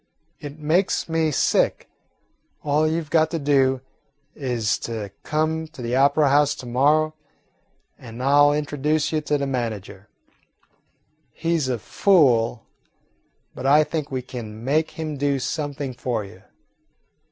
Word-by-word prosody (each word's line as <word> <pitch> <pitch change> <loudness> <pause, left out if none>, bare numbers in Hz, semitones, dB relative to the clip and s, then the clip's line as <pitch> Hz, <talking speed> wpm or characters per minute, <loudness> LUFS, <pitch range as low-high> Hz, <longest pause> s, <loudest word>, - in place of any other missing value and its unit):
It 145 0 -8
makes 160 +5 +1
me 160 -1 +1
sick. 150 - +1 0.8
All 150 +1 +2
you 165 +1 -1
've 150 - -19
got 160 -1 +3
to 165 - -2
do 135 -3 +2 0.5
is 120 -7 -1
to 110 -4 -5
come 160 +1 -1
to 155 - -12
the 120 +1 -1
opera 140 +2 +4
house 145 +1 +3
to 130 - -10
morrow 150 +6 +2 0.9
and 120 +1 -8
I 140 +2 +4
'll 145 0 +6
introduce 150 +1 -1
you 155 -1 0
to 150 0 0
the 140 - -2
manager. 110 -6 -4 1.2
He 170 0 -1
's 150 -5 0
a 125 -2 -1
fool, 120 - +2 0.9
but 130 - -4
I 150 +2 +6
think 155 -1 -4
we 130 -2 -3
can 115 -3 -8
make 155 +4 +1
him 155 -2 -4
do 140 0 +1
something 145 -1 -4
for 120 -3 -3
you." 100 - -14
145 Hz, 145 wpm, -23 LUFS, 125-155 Hz, 1.2 s, ll